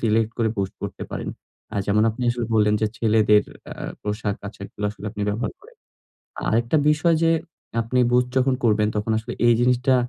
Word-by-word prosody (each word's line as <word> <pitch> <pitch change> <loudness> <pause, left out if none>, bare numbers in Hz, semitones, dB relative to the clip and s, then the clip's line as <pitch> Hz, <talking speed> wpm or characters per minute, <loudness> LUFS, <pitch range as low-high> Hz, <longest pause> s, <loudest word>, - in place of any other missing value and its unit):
Select 110 0 +2
করে 115 -1 +2
boost 95 -1 -2
করতে - - -5
পারেন। - - -4 0.5
আ - - -2
যেমন 105 +1 +3
আপনি 120 +3 -6
আসলে 120 -2 -2
বললেন 105 -1 +4
যে 110 - +2
ছেলেদের 105 -2 +4 0.3
আ - - -8 0.3
পোশাক 105 -1 -2
আশাকগুলো 100 0 -8
আসলে 105 -1 -12
আপনি 105 - -5
ব্যবহার 110 +4 -2
করেন। 470 +4 -18 0.7
আরেকটা 120 +7 +2
বিষয় 160 +2 +3
যে 165 - +4 0.5
আপনি 125 +3 0
বুস্ট 125 0 +3
যখন 130 0 +3
করবেন 105 -2 +3
তখন 105 +2 -1
আসলে 110 - -5
এই 120 - +7
জিনিসটা 125 +1 +3
110 Hz, 180 wpm, -23 LUFS, 105-125 Hz, 0.7 s, এই